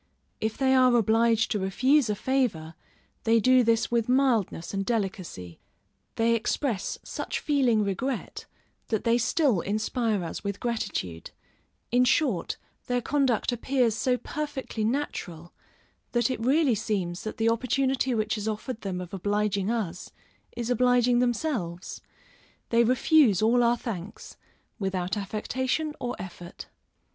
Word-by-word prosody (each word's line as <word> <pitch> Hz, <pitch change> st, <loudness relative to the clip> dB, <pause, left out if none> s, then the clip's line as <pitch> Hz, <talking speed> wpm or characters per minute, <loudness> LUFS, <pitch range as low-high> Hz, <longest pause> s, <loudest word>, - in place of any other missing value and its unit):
If 220 Hz, 0 st, -2 dB
they 265 Hz, -1 st, +3 dB
are 255 Hz, -2 st, +5 dB
obliged 225 Hz, 0 st, +3 dB
to 210 Hz, -, 0 dB
refuse 255 Hz, +7 st, +2 dB
a 210 Hz, -, +1 dB
favor, 205 Hz, -11 st, -1 dB, 0.5 s
they 225 Hz, 0 st, +4 dB
do 255 Hz, +3 st, +5 dB
this 230 Hz, 0 st, +1 dB
with 235 Hz, -1 st, +1 dB
mildness 245 Hz, -10 st, +1 dB
and 195 Hz, 0 st, -1 dB
delicacy; 190 Hz, -, -4 dB, 0.6 s
they 230 Hz, +1 st, +2 dB
express 230 Hz, -1 st, -1 dB
such -, -, -4 dB
feeling 255 Hz, -7 st, +2 dB
regret, 245 Hz, +7 st, -3 dB, 0.4 s
that 220 Hz, -3 st, -1 dB
they 235 Hz, +1 st, +3 dB
still 245 Hz, -, +2 dB
inspire 215 Hz, 0 st, -1 dB
us 165 Hz, -, -6 dB
with 200 Hz, -1 st, -3 dB
gratitude; 95 Hz, -, -3 dB, 0.6 s
in 245 Hz, +1 st, +4 dB
short, 250 Hz, -, +1 dB, 0.3 s
their 245 Hz, 0 st, +1 dB
conduct 260 Hz, -2 st, +1 dB
appears 245 Hz, -1 st, +1 dB
so 255 Hz, +1 st, +1 dB
perfectly 280 Hz, -6 st, -4 dB
natural, 200 Hz, -, -3 dB, 0.6 s
that 240 Hz, +2 st, +2 dB
it 255 Hz, -, -3 dB
really 270 Hz, +3 st, +3 dB
seems 195 Hz, -5 st, -2 dB
that 215 Hz, -, -5 dB
the 225 Hz, 0 st, +2 dB
opportunity 255 Hz, +2 st, +1 dB
which 215 Hz, 0 st, -1 dB
is 210 Hz, -, -4 dB
offered 220 Hz, +2 st, -4 dB
them 185 Hz, -2 st, -3 dB
of 180 Hz, 0 st, -9 dB
obliging 205 Hz, +1 st, 0 dB
us, 200 Hz, -7 st, -3 dB, 0.5 s
is 240 Hz, 0 st, -2 dB
obliging 245 Hz, 0 st, +3 dB
themselves; 240 Hz, -, -2 dB, 0.7 s
they 235 Hz, 0 st, +4 dB
refuse 255 Hz, -, +4 dB
all 235 Hz, +3 st, +3 dB
our 240 Hz, 0 st, +3 dB
thanks, 210 Hz, -4 st, -7 dB, 0.4 s
without 185 Hz, -2 st, -1 dB
affectation 255 Hz, +9 st, -2 dB
or 245 Hz, 0 st, -3 dB
effort. 175 Hz, -1 st, -9 dB
230 Hz, 135 wpm, -27 LUFS, 200-255 Hz, 0.7 s, are